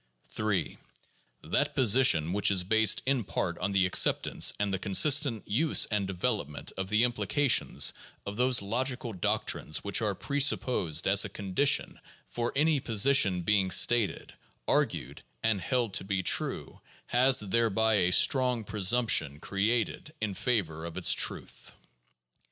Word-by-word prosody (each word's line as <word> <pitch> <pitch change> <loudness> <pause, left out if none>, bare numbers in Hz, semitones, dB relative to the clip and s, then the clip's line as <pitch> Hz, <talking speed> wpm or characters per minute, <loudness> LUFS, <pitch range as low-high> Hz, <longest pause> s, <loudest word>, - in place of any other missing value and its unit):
3. 105 -6 -3 0.6
That - - -1
position 110 - +2
which 100 0 +1
is 95 -3 +2
based 110 +2 +2
in 130 -2 0
part 90 -3 -4
on 100 - -2
the 95 -1 +2
acceptance 95 - +2
and 100 -1 -2
the 95 - -2
consistent 130 - +1
use 145 +10 +2
and 105 -2 -1
development 95 - -4
of 95 0 -5
the 110 +2 +2
implications 125 +4 +1 0.3
of 100 - -6
those 125 -1 +1
log 120 +6 -2
ical 120 -7 -5
doctrines 75 - -2
which 100 +3 0
are 105 -3 -1
presupposed 125 - 0
as 100 +1 +4
a 105 - -6
condition 100 +9 -1 0.3
for 120 0 -4
any 150 +1 +1
position 110 -5 +2
being 100 0 +1
stated, 115 +3 +2 0.3
argued, - - -1 0.2
and 110 -4 0
held 120 +1 -2
to - - -1
be 95 -1 -3
true - - -1 0.2
has, 130 +2 +4
thereby, 110 +1 +1
a 90 -2 +1
strong 125 +2 +2
pre 105 0 -7
sumption 95 - +1
created 110 - -2
in 110 -2 -3
favor 90 -9 -2
of 85 -1 -8
its - - +3
truth. - - -3
105 Hz, 145 wpm, -28 LUFS, 95-125 Hz, 0.6 s, as